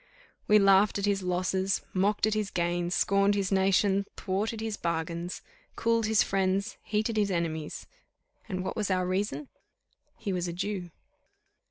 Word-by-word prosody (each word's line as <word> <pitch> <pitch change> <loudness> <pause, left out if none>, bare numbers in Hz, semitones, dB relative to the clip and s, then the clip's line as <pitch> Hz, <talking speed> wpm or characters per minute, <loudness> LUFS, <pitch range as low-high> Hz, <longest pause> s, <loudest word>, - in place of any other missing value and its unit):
"We 210 - +6
laughed 195 0 +5
at 200 - -1
his 200 -1 +1
losses, 185 +1 0
mocked 200 +3 +2
at 215 - +1
his 215 -2 -1
gains, 175 0 -1
scorned 200 +1 +3
his 195 -1 -1
nation, 195 +1 +3
thwarted 210 +4 -2
his 220 -1 -3
bargains, 170 0 -3 0.3
cooled 230 -1 +1
his 220 -1 +4
friends, 195 +3 0
heated 220 +1 -1
his 205 -1 +2
enemies 165 -4 -3 0.6
and 185 -2 -2
what 185 - -3
was 215 -3 -1
our 185 -1 +1
reason? 200 +10 -2 0.7
he 210 -4 -3
was 180 -1 -1
a 170 - -4
Jew." 185 0 -3
195 Hz, 155 wpm, -29 LUFS, 180-210 Hz, 0.7 s, We